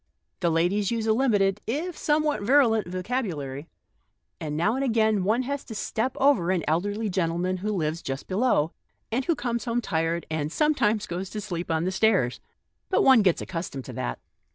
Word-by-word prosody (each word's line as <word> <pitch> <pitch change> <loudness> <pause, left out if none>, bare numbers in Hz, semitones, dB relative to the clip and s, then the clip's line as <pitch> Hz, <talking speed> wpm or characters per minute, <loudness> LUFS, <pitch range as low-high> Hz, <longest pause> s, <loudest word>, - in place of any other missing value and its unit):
The 175 - +1
ladies 180 +5 +1
use 230 -2 -1
a 220 - +3
limited, 210 -5 +2
if 310 +9 -2
somewhat 300 -2 +1
virulent, 225 -3 +3
vocabulary, 175 - -3 0.7
and 150 -1 -4
now 200 +7 +2
and 265 +2 -1
again 220 -5 +2
one 220 +6 +2
has 280 +2 -3
to 220 - -8
step 225 +4 -2
over 270 -11 +3
an 185 -3 +1
elderly 205 +8 0
gentleman 180 -1 0
who 210 +4 -2
lives 165 -4 -1
just 135 +1 -5
below, 185 -6 +2 0.4
and 255 +3 0
who 335 - +2
comes 235 -4 -2
home 235 0 0
tired, 165 -5 -1
and 155 -1 -2
sometimes 225 - +2
goes 180 +2 -4
to 215 - -5
sleep 180 -4 -5
on 160 0 +1
the 185 - 0
stairs. 190 - +2 0.5
But 375 - +3
one 260 -4 +7
gets 185 -4 +2
accus 165 -1 -4
tomed 135 -1 -7
to - - -8
that." - - -3
205 Hz, 185 wpm, -26 LUFS, 170-235 Hz, 0.7 s, one